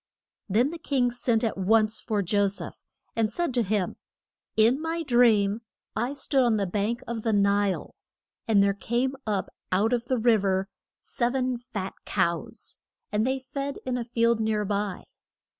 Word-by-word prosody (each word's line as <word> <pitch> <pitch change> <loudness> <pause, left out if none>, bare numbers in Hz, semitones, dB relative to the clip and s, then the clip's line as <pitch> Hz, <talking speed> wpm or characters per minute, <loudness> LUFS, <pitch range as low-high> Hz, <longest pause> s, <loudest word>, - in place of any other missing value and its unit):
Then 235 +9 +3
the 340 - -7
king 260 -5 +1
sent 240 -1 0
at 220 -4 -1
once 215 +3 +2
for 210 -2 -1
Jo 205 +3 +2
seph, 195 - -5 0.4
and 225 -1 +1
said 340 +2 -1
to 245 - +3
him: 205 -3 -1 0.6
In 235 +6 +4
my 330 +1 -2
dream 230 -5 +4 0.3
I 240 +5 -1
stood 275 -1 +1
on 235 -3 +3
the 200 - 0
bank 210 +6 -1
of 230 -1 -3
the 225 - 0
Nile. 200 -1 +1 0.5
And 205 -3 +5
there 200 0 +3
came 240 +6 -1
up 205 -3 -1 0.2
out 210 +6 +2
of 240 -1 0
the 255 - 0
riv 225 -3 +3
er 190 0 0 0.3
sev 245 +1 -1
en 255 -1 0
fat 215 -6 -5
cows, 170 0 -2 0.3
and 215 +3 +1
they 265 +1 +1
fed 275 +2 -5
in 255 -1 -1
a 245 - -1
field 230 -1 +1
near 215 -1 0
by. 200 -1 -2
225 Hz, 175 wpm, -27 LUFS, 205-245 Hz, 0.6 s, And